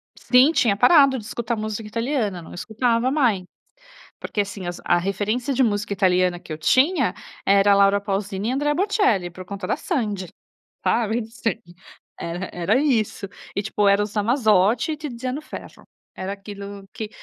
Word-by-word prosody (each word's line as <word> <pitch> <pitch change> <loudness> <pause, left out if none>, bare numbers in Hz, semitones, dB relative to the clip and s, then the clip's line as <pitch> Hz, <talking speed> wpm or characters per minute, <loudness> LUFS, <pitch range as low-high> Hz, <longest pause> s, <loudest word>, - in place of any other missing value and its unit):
Sim, 255 +5 +4
tinha 225 -10 +2
parado 270 - +5
de 215 - -8
escutar 235 0 -3
música 215 0 -4
italiana. 230 - -2
Não - - -12
escutava 230 +5 0
mai 235 -11 +2 0.8
porque, 205 - -2
assim, 195 -2 -6
as 175 - -5
a 175 - +4
referência 210 +8 -1
de 260 +1 +3
música 205 -2 0
italiana 180 -2 +2
que 165 - -13
eu - - -5
tinha, 260 - +3 0.3
era 200 +1 +5
"Laura 200 0 +4
Pauzini" 200 +1 -2
e - - 0
"Andrea 295 +2 0
Bocelli", 365 - +1
por 185 +1 -10
conta 200 -1 -6
da - - +1
Sandy. 210 - -2 0.6
Sabe, 230 0 +1
em 220 - -5
sede. 225 -5 -5 0.4
Era 175 +2 -4
era 175 +5 +1
isso. 220 -8 0 0.3
E, 200 - 0
tipo, 210 -1 0
"Eros 205 +1 +2
Ramazzotti" 220 - +2
e - - -7
"Tiziano 260 -1 -5
Ferro". - - -10 0.3
Era 190 +1 -4
aquilo 200 0 -9
que 215 -1 -5
210 Hz, 165 wpm, -23 LUFS, 195-245 Hz, 0.8 s, parado